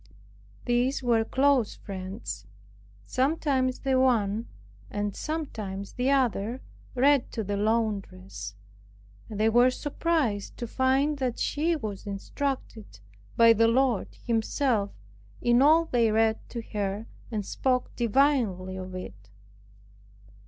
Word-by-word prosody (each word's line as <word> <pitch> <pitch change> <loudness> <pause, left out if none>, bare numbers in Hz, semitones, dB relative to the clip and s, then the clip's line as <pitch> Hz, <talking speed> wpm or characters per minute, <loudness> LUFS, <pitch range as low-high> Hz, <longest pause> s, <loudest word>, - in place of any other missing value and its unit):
These 245 +2 +1
were 235 -2 +3
close 265 -1 +2
friends. 195 +2 -7 0.6
Sometimes 265 -2 0
the 265 -2 +2
one 230 -4 +2 0.4
and 205 -1 -3
sometimes 215 -11 -5
the 250 +2 0
other 250 -3 +1 0.3
read 275 +1 +3
to 220 - -2
this 200 0 -2
laundress; 195 - -2 0.7
and 210 -2 -6
they 215 - +4
were 240 +3 +5
surprised 285 -6 -1
to 240 - -4
find 270 +4 +1
that 250 -3 -1
she 325 +3 0
was 215 -8 -6
instructed 215 - -4 0.4
by 230 0 +8
the 225 +1 +4
Lord 245 -2 +1
Himself 225 -2 +1 0.5
in 240 +1 +3
all 315 +4 +6
they 235 -7 +2
read 220 0 +2
to 235 -2 -5
her, 205 +1 -2 0.2
and 210 -3 -3
spoke 255 +3 -1
divinely 230 -7 +1
of 185 0 -7
it. 105 - -9
230 Hz, 115 wpm, -27 LUFS, 205-265 Hz, 0.7 s, by